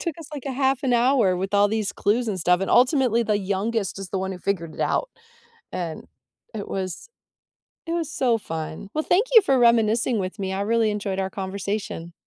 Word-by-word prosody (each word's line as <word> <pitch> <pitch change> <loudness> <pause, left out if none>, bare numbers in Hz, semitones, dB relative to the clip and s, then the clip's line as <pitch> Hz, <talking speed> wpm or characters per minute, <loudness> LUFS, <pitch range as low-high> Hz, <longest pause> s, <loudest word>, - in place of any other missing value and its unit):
took 335 -4 -3
us 325 - -10
like 280 - -7
1/2 265 0 0
hour 235 -6 +3
with 190 +2 -3
all 205 0 +5
these 215 -1 -1
clues 230 +4 0
and 195 -3 -2
stuff, 180 +2 +3
and 195 - -2
ultimately, 250 -2 +4
the 215 -1 +1
youngest 200 +1 -2
is 195 -1 -6
the 195 - -1
one 190 0 -3
who 185 - -7
figured 170 -4 -3
it - - -8
out, - - 0 0.6
and 170 -3 -5 0.5
it 205 -2 -5
was 185 - -4 0.8
it 330 - -2
was 330 -3 -2
so 245 -6 +2
fun. 160 -1 -6
Well, 310 - -1
thank 405 +7 +3
you 450 - +11
for 275 -9 +2
reminiscing 235 0 +3
with 185 +2 -4
me, 190 -1 -2
I 195 - -2
really 225 +1 +2
enjoyed 200 -2 -3
our 190 0 -1
conversation. 195 -3 -4
210 Hz, 200 wpm, -24 LUFS, 190-250 Hz, 0.8 s, you